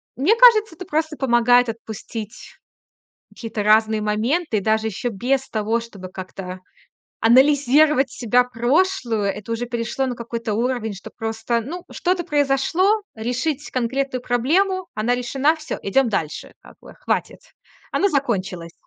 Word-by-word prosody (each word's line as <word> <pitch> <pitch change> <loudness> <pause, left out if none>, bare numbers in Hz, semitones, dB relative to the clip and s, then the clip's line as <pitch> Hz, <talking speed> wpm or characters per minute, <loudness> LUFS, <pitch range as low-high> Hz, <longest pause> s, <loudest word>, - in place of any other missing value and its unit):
мне 320 - +3
кажется, 450 -6 +6
это 370 - -9
просто 315 -1 -2
помогает 245 -1 +4
отпустить 220 -1 -8 0.7
какие-то 225 -2 -5
разные 215 +1 +3
моменты. 220 +6 0
Даже 220 +2 +1
ещё 220 +4 -3
без 255 +5 -1
того, 220 +1 0
чтобы 205 -5 -10
как-то 185 0 -8 0.6
анализировать 275 +3 +4
себя 245 +1 +2
прошлую. 250 - 0
Это 205 +2 -3
уже 230 +1 -2
перешло 235 +2 -2
на 250 - -3
какой-то 230 -1 -4
уровень, 235 -1 -1
что 195 - -10
просто 225 +1 -2
ну 345 +9 -7
что-то 360 -1 -1
произошло, 300 +8 +2
решить 255 +6 -3
конкретную 255 +1 -1
проблему, 355 +11 +1
она 220 +3 0
решена- 270 +6 +1
всё, 315 0 -6
идём 245 +6 +2
дальше. 160 -7 -3
Как - - -16
бы, - - -14
хватит. - - -3 0.5
Она 400 - +2
закончилась. 195 - -2
245 Hz, 135 wpm, -21 LUFS, 220-290 Hz, 0.7 s, кажется